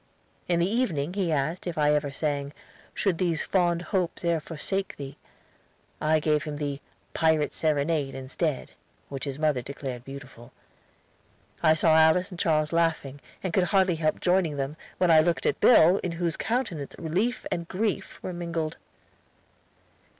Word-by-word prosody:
In 175 -1 +2
the 170 - +2
evening 185 - 0
he 190 -4 0
asked 155 +5 -1
if 170 - -4
I 150 -1 +4
ever 150 -1 +1
sang 140 0 -2 0.4
"Should 190 -5 0
these 170 -4 0
fond 175 -2 +1
hopes 180 -2 -2
e'er 170 -1 +2
forsake 185 +5 -3
thee." 140 -1 -7 0.9
I 155 +1 +3
gave 150 -1 +1
him 150 -1 -4
the 145 -1 -3 0.3
"Pirate's 160 -2 +2
Serenade" 150 -2 0
instead, 135 +2 -3 0.4
which 135 0 -5
his 140 -1 -4
mother 150 -4 +1
declared 130 -1 -6
beautiful. 135 -3 -11 1.1
I 160 -1 +5
saw 160 0 +4
Alice 160 +4 +4
and 180 - -8
Charles 155 -1 +1
laughing, 160 -4 0 0.2
and 185 -3 -2
could 185 0 +3
hardly 190 -3 +2
help 155 -1 0
joining 175 -5 +2
them, 140 +2 -3 0.2
when 180 -2 +3
I 160 - +8
looked 170 +2 +1
at - - +1
Bill, 185 -5 +6
in 180 - -3
whose 170 -1 -1
countenance 225 - -2
relief 190 +10 -1
and 170 -1 -2
grief 205 +2 -2
were 185 - -4
mingled. 170 -2 -3
160 Hz, 155 wpm, -27 LUFS, 145-175 Hz, 1.1 s, I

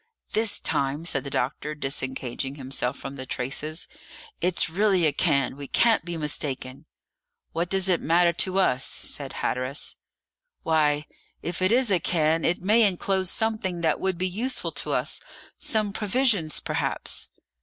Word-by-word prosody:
"This 220 0 +1
time," 140 +4 0
said 135 -6 +1
the 140 - -5
doctor, 145 +4 -2
disengaging 135 -1 -3
himself 130 -2 -2
from 135 0 -7
the 130 - -6
traces, 150 +7 -3 0.5
"it's 180 0 +3
really 190 0 +2
a 150 - +3
cairn; 140 -5 +2
we 140 0 -7
can't 230 - +3
be 170 0 -4
mistaken." 140 -4 -3 0.6
"What 170 +1 -2
does 195 0 +1
it 180 -2 +3
matter 170 +2 +4
to 185 +3 +1
us?" 135 -9 +3
said - - -2
Hatteras. 130 +3 -3 0.7
"Why, 150 -2 +2 0.4
if 175 +2 -4
it 185 +2 +3
is 245 -2 +3
a 185 - +4
cairn, 160 -1 +2
it 175 +1 +1
may 215 +5 +5
inclose 190 -2 +2
something 215 -6 0
that 160 -2 +1
would 190 -2 0
be 185 +2 0
useful 235 +8 -1
to - - -2
us - - -1 0.4
some 215 -3 +1
provisions 210 - +1
perhaps." - - -2
165 Hz, 155 wpm, -26 LUFS, 140-190 Hz, 0.7 s, may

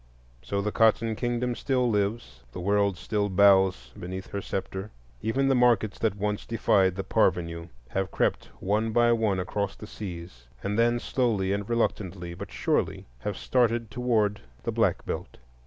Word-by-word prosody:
So 100 +11 -2
the 105 - -1
Cotton 110 0 +3
Kingdom 120 +1 -1
still 125 0 0
lives; 100 - -1
the - - -6
world 100 0 +1
still 105 +2 -1
bows 95 -9 +4
beneath 95 +2 -7
her 100 - -3
sceptre. 95 +1 -4 0.3
Even 135 +5 +1
the 135 - +4
markets 120 -5 +3
that 110 -3 +1
once 105 0 -2
defied 95 -5 +2
the 95 - -3
parvenu 85 -2 0 0.2
have 95 +5 -1
crept - - 0
one 110 +3 0
by 120 0 +4
one 110 -5 +2
across 100 +2 -2
the - - -10
seas, 85 - -8 0.2
and 100 +1 -1
then 120 +1 +3
slowly 110 -7 0
and 100 +1 -3
reluctantly, 95 -6 -1
but - - -8
surely, - - -1
have 105 +6 -4
started 115 -3 +1
toward 110 -3 +1 0.2
the - - -1
Black - - +1
Belt. - - -5
105 Hz, 160 wpm, -27 LUFS, 95-115 Hz, 0.3 s, bows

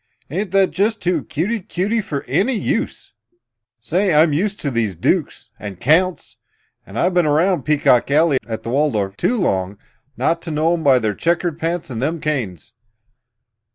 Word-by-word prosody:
Ain't 190 +5 -2
that 195 0 +3
just 215 +3 0
too 180 0 0
cutey 200 +10 -2
cutey 200 +4 -1
for 145 -7 -4
any 195 - 0
use? 210 - -3 0.7
Say, 175 - 0
I'm 155 0 +5
used 200 +7 -1
to 140 - -2
these 115 -6 -1
dooks - - -1
and 100 -3 -7
counts 175 +6 +1 0.5
I've 145 - 0
been 175 -3 +3
around 165 +5 +2
Peacock 145 -5 +3
Alley 150 -1 +3
at 110 -1 -5
the - - -5
Waldorf 115 -8 0
too 245 - 0
long 95 - -1 0.4
not 165 +1 0
to 170 - -7
know 160 +2 +1
'em 165 -2 -2
by 135 -3 +5
their 110 -3 0
checkered 170 - -1
pants 165 -2 -3
and 115 -1 -4
them 160 +5 -1
canes! 115 - -3
155 Hz, 165 wpm, -19 LUFS, 125-180 Hz, 0.7 s, I'm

